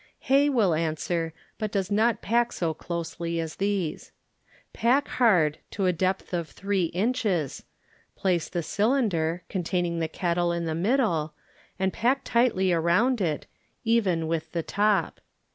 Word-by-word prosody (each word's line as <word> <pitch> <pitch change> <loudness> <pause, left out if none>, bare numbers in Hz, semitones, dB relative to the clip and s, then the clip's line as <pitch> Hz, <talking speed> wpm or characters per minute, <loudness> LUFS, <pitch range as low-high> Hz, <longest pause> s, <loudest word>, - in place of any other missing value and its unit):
Hay 280 +2 +4
will 220 - +3
answer, 165 +1 -1 0.3
but 215 -2 -2
does 195 0 -1
not 220 +2 +2
pack 240 +2 +2
so 165 -2 -1
closely 170 0 -4
as 160 -2 -4
these. 195 -5 -2 0.6
Pack 255 +5 +2
hard 175 - +3
to 195 - -2
a 180 - +3
depth 185 +2 -1
of 170 -2 -2
three 195 -2 -1
inches, 185 - -1 0.5
place 180 -4 0
the 175 -2 -2
cylinder, 190 - +1
con 190 - -2
taining 175 -1 -1
the 160 - 0
kettle 175 0 0
in 170 0 -2
the 160 - -1
middle, 170 - +1 0.4
and 190 0 0
pack 255 +4 +1
tightly 215 -7 +2
around 210 +9 +2
it, 160 -5 -1 0.4
even 205 -8 +2
with 160 0 -2
the 170 -1 -1
top. 205 +2 +1
185 Hz, 145 wpm, -26 LUFS, 165-220 Hz, 0.6 s, Hay